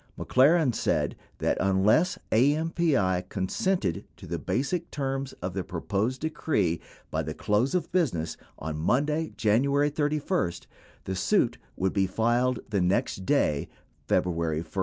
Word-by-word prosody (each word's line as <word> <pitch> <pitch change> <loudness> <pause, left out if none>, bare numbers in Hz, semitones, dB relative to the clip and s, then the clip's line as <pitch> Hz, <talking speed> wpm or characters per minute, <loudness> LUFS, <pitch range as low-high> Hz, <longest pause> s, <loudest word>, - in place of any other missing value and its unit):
McLaren 140 +1 +4
said - - 0 0.2
that, - - 0
unless 100 - +3
AMPI 135 - +2
consented 100 - -1
to - - -11
the - - -3
basic 170 +7 -1
terms 135 -1 -3
of 90 0 -2
the 95 0 -2
proposed 100 +9 -2
decree 105 - 0 0.3
by - - 0
the - - -5
close 110 +10 +1
of 180 - -1
business 115 - 0 0.2
on 75 0 -4
Monday, 150 - +1
January 140 +7 +2
31, 150 - 0 0.5
the 95 - -3
suit 90 - +1 0.2
would 95 0 0
be 95 -2 +2
filed 120 +5 +1
the 100 -3 +1
next 95 +1 0
day, 75 -2 +1 0.4
February 85 -3 +1
1. - - -12
120 Hz, 135 wpm, -27 LUFS, 95-150 Hz, 0.5 s, McLaren